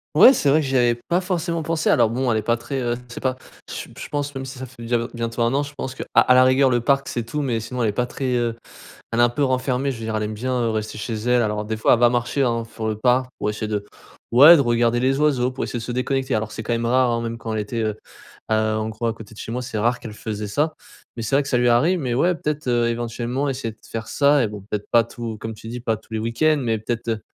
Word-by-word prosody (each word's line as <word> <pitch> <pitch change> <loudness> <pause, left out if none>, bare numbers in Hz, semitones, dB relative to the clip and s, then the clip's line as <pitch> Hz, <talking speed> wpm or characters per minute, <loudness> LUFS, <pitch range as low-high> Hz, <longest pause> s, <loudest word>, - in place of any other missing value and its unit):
Ouais, 265 - +9
c'est 145 - +1
vrai 155 +3 +4
que - - -3
j'y 135 - -1
avais 120 -1 +3
pas 175 +2 +2
forcément 170 -2 -2
pensé. 160 0 0
Alors 115 -3 +4
bon, 125 +1 0
elle 110 - +2
est - - -3
pas 115 +2 +1
très, 135 +4 -4
heu, 120 -1 0
je 120 - -11
sais - - -6
pas 130 -1 -1 0.3
je - - -6
je - - -6
pense 145 -1 -2
même 135 -1 -5
si 130 0 -8
ça 130 - -6
fait 120 -1 -14
déjà 120 +1 0
b 115 +1 -3
bientôt 115 0 -3
1 115 - +1
an, 140 - +2
je 140 0 -9
pense 130 -2 -5
qu'à - - -6
à 125 - +6
la 130 0 +7
rigueur, 130 +1 +4
le 120 -1 +2
parc, 135 +2 +1
c'est 120 - -3
tout, 150 +6 -3
mais 120 -4 0
sinon 120 +2 -3
elle 110 - +2
est - - +1
pas 125 +4 -1
très, 130 0 -2
heu, 120 -1 0 0.6
elle 115 - -1
est - - +6
un 120 - +6
peu 120 +4 -2
renfermée, 130 0 0
je 125 - -5
veux 115 - -7
dire 110 0 -3
elle 105 - -1
aime 105 0 -3
bien, 130 +4 -3
heu, 115 -1 +1
rester 110 -1 -3
chez 110 +3 -4
elle. 120 +3 +2
Alors 105 -1 -1
des 110 +1 -3
fois, 110 - +4
elle - - 0
va 120 -1 +6
marcher, 120 +3 0
hein, 115 -3 0
fur 115 -1 -6
le 110 -1 -1
parc 125 +3 +2
pour 105 - -1
essayer 105 +1 -4
de 105 -1 -2 0.5
ouais 145 +8 +9
de - - +2
regarder 120 -1 +2
les 135 +2 +2
oiseaux, 135 -5 +2
pour 130 - -4
essayer 120 - -4
de - - -7
se 125 - -5
déconnecter. 130 +1 -1
Alors 110 0 -2
c'est 110 - -5
quand 120 - -3
même 115 0 -1
rare, 125 +1 +3
hein, 115 0 -1
même 115 0 -4
quand 115 -1 -5
elle 110 - -1
était, 110 +3 -3
heu, 110 -1 -2 0.5
heu, - - +5 0.2
en 110 0 -2
gros 110 +2 -4
à 115 - +1
côté 110 -1 -12
de - - -15
chez - - -6
moi, 125 +1 -2
c'est 115 -3 -4
rare 120 +3 +1
qu'elle 110 - -8
faisait 105 -1 -5
ça. 150 +9 0 0.4
Mais 115 - -4
c'est 110 +4 -1
vrai 140 - +4
que 140 - -7
ça 125 - +2
lui 125 0 +3
arrive, 155 +11 +3
mais 130 -6 -2
ouais 175 +8 +2
peut-être, 150 -3 -3
heu, 120 -1 +2
éventuellement 120 +3 -2
essayer 130 -4 -3
de 110 - -25
faire 115 0 -4
ça 140 0 +3
et - - -1
bon 105 0 -8
peut-être 105 -1 -3
pas 115 - +6
tout 115 -1 -7
comme 110 0 -5
tu 110 - -13
dis 120 +1 -5
pas 115 -2 0
tous 110 +1 -20
les 110 - -1
week-ends. 120 +8 +2
Mais 115 -2 0
peut-être, 115 +2 -4
heu, 110 -2 -1
120 Hz, 310 wpm, -22 LUFS, 115-130 Hz, 0.6 s, Ouais